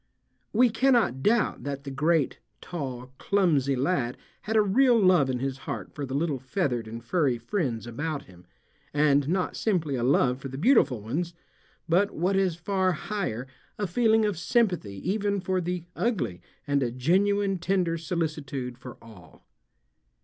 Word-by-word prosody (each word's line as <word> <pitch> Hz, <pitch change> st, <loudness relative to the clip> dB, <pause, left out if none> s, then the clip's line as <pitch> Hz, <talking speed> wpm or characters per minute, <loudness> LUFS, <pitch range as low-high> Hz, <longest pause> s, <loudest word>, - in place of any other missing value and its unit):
We 240 Hz, +2 st, +4 dB
cannot 225 Hz, -, +2 dB
doubt 215 Hz, -, +2 dB
that 140 Hz, -1 st, -4 dB
the 140 Hz, -, -6 dB
great, 150 Hz, +1 st, +1 dB, 0.2 s
tall, 130 Hz, -6 st, -6 dB
clumsy 155 Hz, -9 st, +2 dB
lad 130 Hz, -3 st, 0 dB, 0.2 s
had 220 Hz, -, -3 dB
a 215 Hz, -, +6 dB
real 240 Hz, +4 st, +4 dB
love 180 Hz, -8 st, +4 dB
in 130 Hz, -, 0 dB
his 135 Hz, +1 st, -3 dB
heart -, -, -5 dB
for 145 Hz, -2 st, -5 dB
the 130 Hz, -, -4 dB
little 145 Hz, -2 st, 0 dB
feathered 130 Hz, -, -2 dB
and 115 Hz, +1 st, -7 dB
furry 135 Hz, -3 st, +1 dB
friends 120 Hz, -, -2 dB
about 145 Hz, +5 st, -4 dB
him, 90 Hz, -1 st, -18 dB, 0.5 s
and 145 Hz, -1 st, +3 dB
not 185 Hz, +1 st, 0 dB
simply 175 Hz, -9 st, 0 dB
a 125 Hz, -, -1 dB
love 125 Hz, 0 st, +3 dB
for 135 Hz, -, -6 dB
the 135 Hz, 0 st, -7 dB
beautiful 155 Hz, -, +3 dB
ones, 165 Hz, +10 st, -3 dB, 0.5 s
but 185 Hz, +5 st, +3 dB
what 180 Hz, +4 st, +1 dB
is 190 Hz, -3 st, +2 dB
far 185 Hz, +1 st, 0 dB
higher 155 Hz, -, -3 dB, 0.3 s
a 205 Hz, -, -1 dB
feeling 220 Hz, +3 st, +3 dB
of 205 Hz, -6 st, -1 dB
sympathy 180 Hz, -, +1 dB
even 200 Hz, 0 st, 0 dB
for 185 Hz, 0 st, -1 dB
the 175 Hz, 0 st, -3 dB
ugly 195 Hz, -, -1 dB, 0.2 s
and 140 Hz, -1 st, +1 dB
a 125 Hz, -, +1 dB
genuine 195 Hz, +9 st, +1 dB
tender 175 Hz, -1 st, +1 dB
solicitude 150 Hz, -7 st, -3 dB
for 125 Hz, -1 st, -10 dB
all. 105 Hz, -7 st, -16 dB
165 Hz, 160 wpm, -27 LUFS, 130-195 Hz, 0.5 s, a